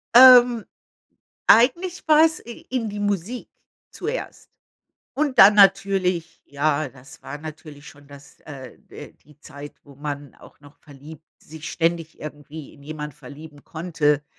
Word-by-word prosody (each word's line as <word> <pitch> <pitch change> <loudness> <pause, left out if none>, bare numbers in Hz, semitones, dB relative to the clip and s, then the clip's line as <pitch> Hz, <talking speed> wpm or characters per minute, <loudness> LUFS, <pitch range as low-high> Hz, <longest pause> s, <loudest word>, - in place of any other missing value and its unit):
Ähm, 245 -2 +8 0.9
eigentlich 340 +10 +3
war 310 0 +6
es 320 -1 0
i 235 - -10
in 245 -3 -2
die 205 0 -6
Musik 205 +4 -3 0.4
zuerst. - - -6 0.7
Und 285 -2 -2
dann 200 +2 +8
natürlich 195 -4 +2
ja, 145 +1 -1
das 130 0 -16
war 145 - -8
natürlich 150 -1 -11
schon 145 -1 -16
das 140 0 -16
äh 135 -4 -11
äh, - - -11
die 150 -1 -24
Zeit, 145 -2 -11
wo 140 -1 -17
man 145 -1 -7
auch - - -18
noch 145 +1 -18
verliebt 155 +2 -14 0.2
sich 160 0 -10
ständig 165 -1 -2
irgendwie 150 0 -10
in 140 - -19
jemanden 150 -1 -8
verlieben 145 +1 -13
konnte. 155 -3 -1
155 Hz, 140 wpm, -22 LUFS, 145-205 Hz, 0.9 s, Ähm